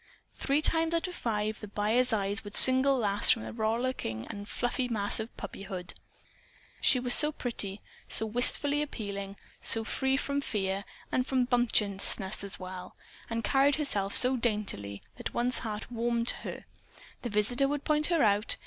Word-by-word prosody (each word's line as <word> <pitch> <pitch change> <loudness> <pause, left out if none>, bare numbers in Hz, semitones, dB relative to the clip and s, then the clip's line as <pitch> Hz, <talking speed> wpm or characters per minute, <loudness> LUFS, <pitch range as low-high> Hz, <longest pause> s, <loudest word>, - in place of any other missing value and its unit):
Three 285 +3 0
times 325 +1 +3
out 335 +3 0
of 360 - -7
five, 215 -7 -2
the 210 - -8
buyer's 220 +5 +1
eye 200 -2 0
would 205 0 -8
single 265 +1 +5
Lass 205 -4 +2
from 225 - +4
the - - -7
rollicking 225 - -2
and 205 0 -9
fluffy 245 +1 -1
mass 210 -4 +2
of 220 +1 -7
puppyhood. 190 -3 -7 0.9
She 255 - +5
was 245 0 +6
so 300 0 +7
pretty, 215 -8 -4 0.3
so 220 - +2
wistfully 265 +6 +2
appealing, 200 -8 -5 0.3
so 225 - +2
free 265 +4 0
from 280 0 -2
fear 195 -5 -2 0.3
(and 255 0 0
from 255 -2 +1
bumptiousness 210 -5 +1
as 200 - -5
well) 185 0 -8 0.3
and 230 0 -3
carried 275 +5 +3
herself 205 -10 0
so 255 +1 +3
daintily, 210 - -2
that - - -6
one's 245 +1 +2
heart 215 0 -6
warmed 235 0 -1
to - - 0
her. - - -8 0.6
The 240 - -4
visitor 230 +6 +1
would 290 0 -3
point 305 -1 0
her 335 -3 +2
out. 205 0 +2
230 Hz, 165 wpm, -29 LUFS, 205-260 Hz, 0.9 s, so